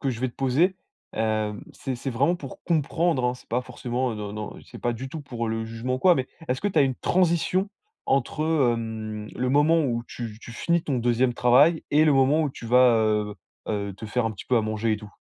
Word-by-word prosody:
que 135 Hz, -, 0 dB
je 120 Hz, -, -5 dB
vais 130 Hz, -, 0 dB
te -, -, -14 dB
poser, 140 Hz, +8 st, +2 dB, 0.4 s
hem 110 Hz, -1 st, -1 dB
c'est 135 Hz, -, -4 dB
c'est 125 Hz, +2 st, -4 dB
vraiment 140 Hz, +8 st, +2 dB
pour 140 Hz, -7 st, -9 dB
comprendre, 160 Hz, -3 st, +1 dB
hein, 125 Hz, 0 st, +1 dB
c'est 125 Hz, -, -17 dB
pas 125 Hz, +2 st, 0 dB
forcément 125 Hz, 0 st, -3 dB
non, 105 Hz, -1 st, -5 dB
non, 105 Hz, 0 st, -6 dB
c'est -, -, -11 dB
pas 120 Hz, -, 0 dB
du 130 Hz, +3 st, -6 dB
tout 155 Hz, +3 st, -6 dB
pour 120 Hz, -5 st, -4 dB
le 115 Hz, 0 st, -2 dB
jugement 115 Hz, +3 st, -3 dB
ou -, -, -2 dB
quoi, 180 Hz, +2 st, +5 dB
mais 130 Hz, -1 st, -1 dB, 0.2 s
est-ce 125 Hz, +1 st, -1 dB
que -, -, -1 dB
tu 200 Hz, -, -3 dB
as -, -, +7 dB
une 130 Hz, -2 st, 0 dB
transition 185 Hz, +2 st, +1 dB, 0.3 s
entre 140 Hz, +3 st, 0 dB
heu, 155 Hz, -6 st, +3 dB
hem, 110 Hz, -2 st, -5 dB
le 125 Hz, +1 st, -1 dB
moment 150 Hz, +5 st, +4 dB
où 120 Hz, -3 st, -1 dB
tu 115 Hz, -3 st, -7 dB
tu 120 Hz, -, -10 dB
finis 170 Hz, +8 st, 0 dB
ton 135 Hz, -5 st, -1 dB
2e 120 Hz, +1 st, +2 dB
travail 140 Hz, +8 st, +4 dB
et 150 Hz, +2 st, +5 dB
le 155 Hz, -, +4 dB
moment 135 Hz, +3 st, +4 dB
où 150 Hz, -, -1 dB
tu 120 Hz, -, -10 dB
vas 125 Hz, 0 st, +5 dB
heu 105 Hz, -1 st, +1 dB, 0.3 s
heu 100 Hz, -2 st, -2 dB
te 110 Hz, -, -8 dB
faire 125 Hz, +3 st, 0 dB
un 115 Hz, -, -2 dB
petit 100 Hz, -, -10 dB
peu 125 Hz, -, +2 dB
à -, -, +4 dB
manger 110 Hz, +1 st, -1 dB
et -, -, +1 dB
tout? 105 Hz, 0 st, -11 dB
125 Hz, 245 wpm, -25 LUFS, 115-145 Hz, 0.4 s, as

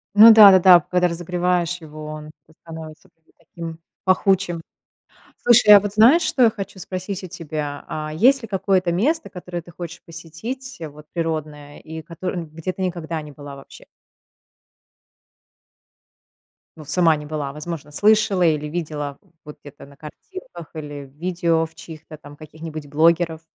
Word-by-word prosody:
Ну 220 Hz, +2 st, +10 dB
да-да-да, 190 Hz, -4 st, +8 dB
когда 180 Hz, +3 st, +1 dB
разогреваешь 175 Hz, 0 st, -1 dB
его, 155 Hz, -1 st, -10 dB
он 155 Hz, 0 st, -8 dB, 0.2 s
это 160 Hz, -, -25 dB
становится 160 Hz, -2 st, -11 dB
как 165 Hz, -, -48 dB
бы -, -, -30 dB
таким 165 Hz, -1 st, -9 dB, 0.2 s
пахучим. 185 Hz, -2 st, +1 dB, 0.8 s
Слушай, 235 Hz, -3 st, +6 dB
а -, -, +8 dB
вот 205 Hz, 0 st, -5 dB
знаешь, 240 Hz, +11 st, +6 dB
что 310 Hz, -5 st, +1 dB
я 230 Hz, -, +6 dB
хочу 200 Hz, -3 st, -8 dB
спросить 185 Hz, +1 st, -5 dB
у -, -, -6 dB
тебя, 150 Hz, -4 st, -6 dB
а. 155 Hz, 0 st, -5 dB
Есть 260 Hz, -, +4 dB
ли 225 Hz, -, -8 dB
какое-то 190 Hz, -2 st, 0 dB
место, 295 Hz, -, 0 dB
которое 180 Hz, -2 st, -7 dB
ты 175 Hz, -, -15 dB
хочешь 175 Hz, 0 st, -9 dB
посетить, 195 Hz, +11 st, -8 dB
вот 150 Hz, +1 st, -14 dB
природное, 155 Hz, -3 st, -4 dB
и 160 Hz, 0 st, -9 dB
которо 180 Hz, +3 st, -6 dB
где 165 Hz, +2 st, -5 dB
ты -, -, -8 dB
никогда 170 Hz, -3 st, -4 dB
не 150 Hz, -, -11 dB
была 145 Hz, -1 st, -10 dB
вообще? 135 Hz, -, -14 dB, 2.9 s
Ну, 155 Hz, -, -11 dB
сама 165 Hz, 0 st, +3 dB
не 150 Hz, -, -9 dB
была. 150 Hz, -2 st, -4 dB
Возможно, 150 Hz, 0 st, -7 dB
слышала 205 Hz, +1 st, +3 dB
или 155 Hz, -3 st, +1 dB
видела 150 Hz, -3 st, -5 dB
в -, -, -30 dB, 0.2 s
вот 150 Hz, -, -11 dB
где-то 145 Hz, -1 st, -13 dB
на 140 Hz, 0 st, -18 dB
картинках, 170 Hz, -, -11 dB
или 145 Hz, -2 st, -7 dB
в 135 Hz, +1 st, -22 dB
видео 170 Hz, -2 st, 0 dB
в 160 Hz, 0 st, -15 dB
чьих-то 160 Hz, -1 st, -11 dB
там 145 Hz, -1 st, -14 dB
каких-нибудь 155 Hz, -1 st, -9 dB
блогеров. 165 Hz, +2 st, +2 dB
165 Hz, 160 wpm, -21 LUFS, 155-185 Hz, 2.9 s, Ну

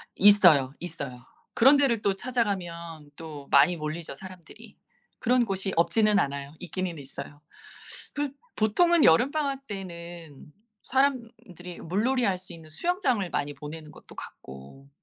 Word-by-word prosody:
있어요, 180 Hz, -10 st, +6 dB
있어요. 140 Hz, -8 st, -7 dB, 0.3 s
그런 270 Hz, +5 st, +6 dB
데를 255 Hz, -6 st, +2 dB
또 200 Hz, -2 st, +1 dB
찾아가면 175 Hz, -, -3 dB
또 150 Hz, -3 st, -9 dB
많이 145 Hz, +6 st, +5 dB
몰리죠 155 Hz, 0 st, -5 dB
사람들이. 185 Hz, +1 st, -13 dB, 0.4 s
그런 245 Hz, 0 st, +2 dB
곳이 195 Hz, -1 st, -3 dB
없지는 210 Hz, +5 st, +3 dB
않아요. 140 Hz, -1 st, -3 dB
있기는 180 Hz, -1 st, -4 dB
있어요. 140 Hz, +1 st, -9 dB, 0.7 s
그 290 Hz, -2 st, -2 dB, 0.2 s
보통은 320 Hz, +10 st, +3 dB
여름방학 275 Hz, -, +2 dB
때는 170 Hz, -6 st, -9 dB, 0.3 s
사람들이 235 Hz, -9 st, -2 dB
물놀이 235 Hz, +9 st, 0 dB
할 190 Hz, -4 st, +1 dB
수 185 Hz, -1 st, -11 dB
있는 160 Hz, -2 st, -13 dB
수영장을 260 Hz, -, 0 dB
많이 145 Hz, 0 st, -2 dB
보내는 150 Hz, +2 st, -9 dB
것도 -, -, -15 dB
같고. 70 Hz, -, -12 dB
180 Hz, 300 characters per minute, -27 LUFS, 155-230 Hz, 0.7 s, 있어요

